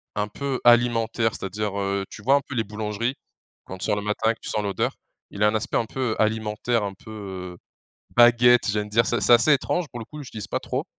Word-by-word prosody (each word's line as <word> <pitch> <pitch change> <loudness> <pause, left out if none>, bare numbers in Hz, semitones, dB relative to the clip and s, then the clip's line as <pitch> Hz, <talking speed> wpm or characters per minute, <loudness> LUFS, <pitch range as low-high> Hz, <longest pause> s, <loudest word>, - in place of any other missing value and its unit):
Un 105 0 -1
peu 135 +3 -3
alimentaire, 115 -2 +3
c'est-à-dire, 100 +1 -3
heu, 100 0 -1
tu - - -10
vois 135 +4 +5
un 140 - +2
peu 130 - -6
les 115 - +1
boulangeries? 105 +4 -3 0.5
Quand 95 - -8
tu 90 - -5
sors 105 - +1
le - - -2
matin 105 +2 0
et - - -2
que - - -32
tu - - -6
sens 105 - -1
l'odeur, 100 -1 -1 0.4
il 100 - -2
a - - +6
un 105 - +1
aspect 110 - -2
un 115 - 0
peu 120 -1 -2
alimentaire, 110 +1 0
un 100 -1 -3
peu, 105 +3 -13
heu, 95 -4 -7 0.6
baguette 120 0 +6
j'ai 105 0 0
envie 105 - -5
de - - -18
dire. 115 0 +4
C'est 120 - 0
c'est - - +4
assez 120 +6 +5
étrange 160 +5 +1
pour 120 - -7
le - - -6
coup, 150 -1 -9
j'utilise 110 -6 -7
pas - - -2
trop. - - -3
110 Hz, 250 wpm, -24 LUFS, 105-120 Hz, 0.6 s, a